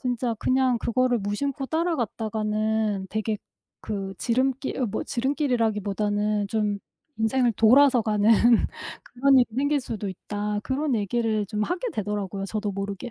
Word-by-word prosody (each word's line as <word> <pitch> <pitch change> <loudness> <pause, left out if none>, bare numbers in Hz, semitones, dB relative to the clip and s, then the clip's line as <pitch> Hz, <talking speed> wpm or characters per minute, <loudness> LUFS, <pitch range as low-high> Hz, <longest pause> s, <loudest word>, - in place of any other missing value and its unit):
진짜 245 -2 -1
그냥 255 -1 +2
그거를 245 +1 +1
무심코 265 +7 -2
따라갔다가는 220 - -1
되게 215 -1 -2 0.4
그 195 -2 -4
지름길 260 +3 0
어 - - +2
뭐 215 - -3
지름길이라기보다는 210 -6 0
좀 210 -2 0 0.4
'인생을 235 +2 +2
돌아서 250 +3 +5
가는 210 0 +2 0.7
그런 270 +2 +3
일이 245 - +4
생길 285 +1 +1
수도 215 -5 -5
있다.' 205 +2 -4
그런 270 +2 0
얘기를 215 0 0
좀 210 +2 -2
하게 365 - -2
되더라고요 200 -2 -3
저도 210 0 -3
모르게. 200 +4 -5
220 Hz, 320 characters per minute, -25 LUFS, 210-255 Hz, 0.7 s, 돌아서